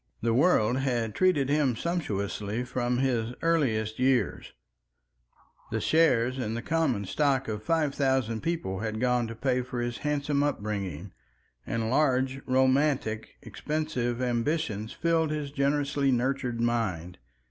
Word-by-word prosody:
The 115 Hz, -1 st, +2 dB
world 125 Hz, -4 st, +3 dB
had 120 Hz, -5 st, -1 dB
treated 180 Hz, -8 st, +2 dB
him 140 Hz, -4 st, +2 dB
sumptuously 110 Hz, -, -2 dB
from 125 Hz, 0 st, -1 dB
his 125 Hz, -2 st, 0 dB
earliest 115 Hz, -10 st, +1 dB
years; 125 Hz, -5 st, +1 dB, 1.2 s
the -, -, -1 dB
shares 130 Hz, -6 st, +3 dB
in 110 Hz, -3 st, -2 dB
the 120 Hz, -, -4 dB
common 145 Hz, -11 st, 0 dB
stock 135 Hz, +5 st, +1 dB
of 105 Hz, -1 st, -3 dB
five 155 Hz, +3 st, +1 dB
thousand 130 Hz, -5 st, 0 dB
people 150 Hz, -, -2 dB
had 110 Hz, 0 st, -3 dB
gone 125 Hz, -1 st, +1 dB
to 115 Hz, -, -7 dB
pay 125 Hz, +1 st, 0 dB
for 125 Hz, 0 st, -5 dB
his 120 Hz, 0 st, -3 dB
handsome 145 Hz, -1 st, 0 dB
upbringing, 100 Hz, -, -3 dB, 0.5 s
and 115 Hz, 0 st, -1 dB
large, 130 Hz, -1 st, +1 dB
romantic, 130 Hz, -3 st, +1 dB
expensive 125 Hz, 0 st, -2 dB
ambitions 120 Hz, -3 st, -1 dB
filled 165 Hz, -1 st, +1 dB
his 150 Hz, -2 st, -3 dB
generously 140 Hz, 0 st, +1 dB
nurtured 125 Hz, -1 st, 0 dB
mind. 105 Hz, -8 st, -1 dB
125 Hz, 130 wpm, -28 LUFS, 115-145 Hz, 1.2 s, world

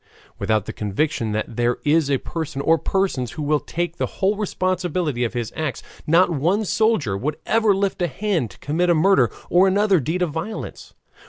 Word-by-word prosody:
Without 110 Hz, -3 st, +1 dB
the -, -, -6 dB
conviction 110 Hz, +2 st, -1 dB
that 110 Hz, +1 st, -3 dB
there 120 Hz, 0 st, +1 dB
is 150 Hz, 0 st, +3 dB
a 140 Hz, -, +3 dB
person 155 Hz, -1 st, -5 dB
or 165 Hz, +2 st, +3 dB
persons 180 Hz, -, -1 dB
who 155 Hz, -, -5 dB
will 150 Hz, +1 st, +2 dB
take 175 Hz, +2 st, -4 dB
the -, -, -1 dB
whole 195 Hz, +2 st, +2 dB
responsibility 180 Hz, -, -1 dB
of 120 Hz, -, -2 dB
his 120 Hz, -2 st, -3 dB
acts, 155 Hz, -4 st, -3 dB, 0.2 s
not 175 Hz, +3 st, +4 dB
one 175 Hz, +8 st, +1 dB
soldier 200 Hz, -, +1 dB
would 145 Hz, +9 st, -2 dB
ever 220 Hz, -3 st, +3 dB
lift 195 Hz, -1 st, -1 dB
a 175 Hz, -, +2 dB
hand 165 Hz, -, -1 dB
to 90 Hz, -, -15 dB
commit 170 Hz, +5 st, 0 dB
a 170 Hz, -, +5 dB
murder 155 Hz, -, +4 dB, 0.2 s
or 180 Hz, +3 st, +5 dB
other 205 Hz, -3 st, +4 dB
deed 160 Hz, +7 st, -1 dB
of 170 Hz, -, -1 dB
violence. 170 Hz, +8 st, -6 dB
160 Hz, 190 wpm, -22 LUFS, 130-185 Hz, 0.2 s, a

